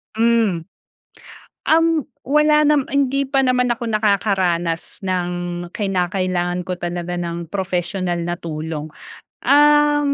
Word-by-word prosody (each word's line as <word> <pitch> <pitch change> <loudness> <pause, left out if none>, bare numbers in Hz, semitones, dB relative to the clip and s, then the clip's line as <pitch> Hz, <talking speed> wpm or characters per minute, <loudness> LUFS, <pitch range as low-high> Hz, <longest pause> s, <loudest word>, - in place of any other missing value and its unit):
Hmm, 225 -6 +2 1.0
um, 325 +1 +4 0.4
wala 300 +2 +3
nama 295 -2 +3
hindi 275 0 +1
pa 270 0 +1
naman 250 -1 +2
ako 235 -1 -4
nakakaranas 190 -6 0
ng 185 -2 -1 0.5
kinakailangan 180 -2 -1
ko 180 0 -4
talaga 175 0 -4
ng 170 -1 -5
professional 180 -2 -2
na 175 +1 -2
tulong. 155 -2 -5 0.6
Ah, 295 +1 +5
190 Hz, 105 wpm, -20 LUFS, 175-260 Hz, 1.0 s, Ah